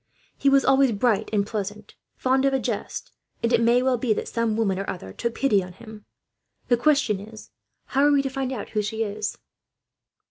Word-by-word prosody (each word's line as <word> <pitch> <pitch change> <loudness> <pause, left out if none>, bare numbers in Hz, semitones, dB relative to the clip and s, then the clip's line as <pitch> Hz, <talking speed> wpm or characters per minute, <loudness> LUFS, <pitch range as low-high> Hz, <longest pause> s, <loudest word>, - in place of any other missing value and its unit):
He 275 - +2
was 275 0 +4
always 270 -1 +4
bright 210 0 +1
and 205 -2 +1
pleasant, 210 0 -5 0.2
fond 265 +1 +2
of 270 -1 +2
a - - +1
jest, 220 -3 -4 0.3
and 235 +1 +1
it 235 - +4
may 240 +2 +4
well 255 -2 +1
be 235 -3 +2
that - - -4
some 230 -2 -1
woman 195 -4 +1
or 195 - -4
other 95 - -6
took 235 - -3
pity 210 -8 +2
on 180 0 -10
him. 215 +1 -12 0.6
The 245 - +5
question 275 -6 +2
is, 215 +2 -12 0.3
how 275 +1 +2
are - - +4
we 280 -1 +3
to 270 - -1
find 265 -1 -2
out 260 - -5
who 215 - 0
she 220 +2 -2
is?" 210 0 -4
230 Hz, 210 wpm, -24 LUFS, 210-265 Hz, 0.6 s, The